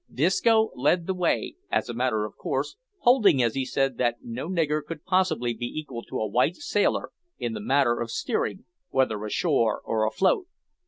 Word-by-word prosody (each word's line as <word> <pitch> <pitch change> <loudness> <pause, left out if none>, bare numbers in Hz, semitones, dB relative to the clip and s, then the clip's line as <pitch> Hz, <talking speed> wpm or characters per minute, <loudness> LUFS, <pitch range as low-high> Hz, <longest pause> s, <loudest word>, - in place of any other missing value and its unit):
Disco 220 - +3
led 165 +7 +2
the 190 - -1
way, 180 - -1
as - - 0
a 120 - -4
matter 115 -3 0
of 105 - -9
course, 135 - -3 0.3
holding, 205 - +5
as 115 -2 +1
he 135 - -1
said, 135 0 -1
that 120 -1 +1
no 120 +7 -5
nigger 155 -4 0
could 150 0 -8
possibly 180 -10 +1
be 120 +1 -4
equal 135 -4 -6
to - - -5
a 110 - 0
white 125 - +2
sailor 205 +2 0 0.3
in - - -3
the 220 - -4
matter 135 - +2
of 115 - -3
steering, 105 -3 -2 0.2
whether 110 -6 +1
ashore 115 0 +1
or 110 -1 +1
afloat. 190 - +1
135 Hz, 180 wpm, -26 LUFS, 120-180 Hz, 0.3 s, holding